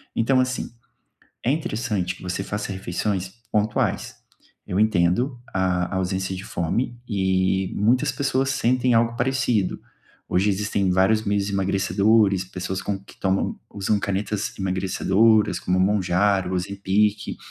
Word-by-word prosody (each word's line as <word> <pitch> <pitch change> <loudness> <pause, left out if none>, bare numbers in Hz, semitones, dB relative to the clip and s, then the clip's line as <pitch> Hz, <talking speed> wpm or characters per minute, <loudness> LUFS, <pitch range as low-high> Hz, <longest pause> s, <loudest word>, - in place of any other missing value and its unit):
Então, 130 +3 +3
assim, 130 0 -1 0.7
é 125 - +3
interessante 105 - -2
que - - -14
você 90 +1 -3
faça 105 0 -4
refeições 95 0 -2 0.2
pontuais, 105 0 0 0.5
eu 90 - -2
entendo 110 +5 +2
a 90 -1 0
ausência 95 0 -2
de 95 - -7
fome 115 +8 -2
e 95 -2 +1
muitas 125 +7 +2
pessoas 135 0 0
sentem 125 -1 +2
algo 115 0 +2
parecido. 125 -7 0 0.5
Hoje, 95 +4 +2
existem 100 -1 0
vários 95 +4 +3
meios 100 -1 0
emagrecedores, 100 +1 +2
pessoas 95 0 -4
com 100 - -2
que 100 - -17
tomam 95 0 0 0.2
usam 100 +1 0
canetas 100 +2 -2
emagrecedoras 95 +3 +2
como 90 +1 0
Mounjaro, 95 0 +2
Ozempic 100 +3 0
100 Hz, 125 wpm, -23 LUFS, 95-110 Hz, 0.7 s, Então